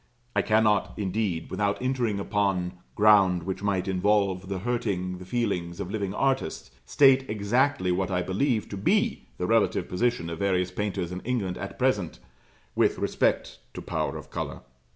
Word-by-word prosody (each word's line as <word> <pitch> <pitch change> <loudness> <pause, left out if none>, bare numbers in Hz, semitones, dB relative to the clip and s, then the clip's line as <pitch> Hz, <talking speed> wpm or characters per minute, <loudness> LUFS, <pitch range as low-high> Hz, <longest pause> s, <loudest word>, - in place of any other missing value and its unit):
I - - +4
cannot, 110 -2 +2
indeed, 95 -4 -2
without 100 +1 0
entering 125 -5 0
upon 100 -3 0 0.2
ground 100 -5 +5
which 95 +2 -4
might 100 -2 0
involve 95 0 +1
the 95 - -2
hurting 95 -5 -2
the 90 - -9
feelings 90 -6 -2
of 90 - -4
living 100 -3 -2
artists, 135 +5 -1 0.2
state 135 -1 +5
exactly 110 0 +1
what 95 +2 0
I 90 -1 0
believe 110 +5 0
to 100 - -5
be 95 - +1
the - - -2
relative - - +2
position 90 -3 -1
of 85 - -6
various 90 -2 +1
painters 100 -4 -3
in 90 - -4
England 105 -6 -2
at 95 - -6
present 105 -10 0 0.6
with - - +2
respect - - 0 0.2
to - - -5
power - - -2
of - - -11
colour. - - -4
100 Hz, 160 wpm, -27 LUFS, 90-110 Hz, 0.6 s, ground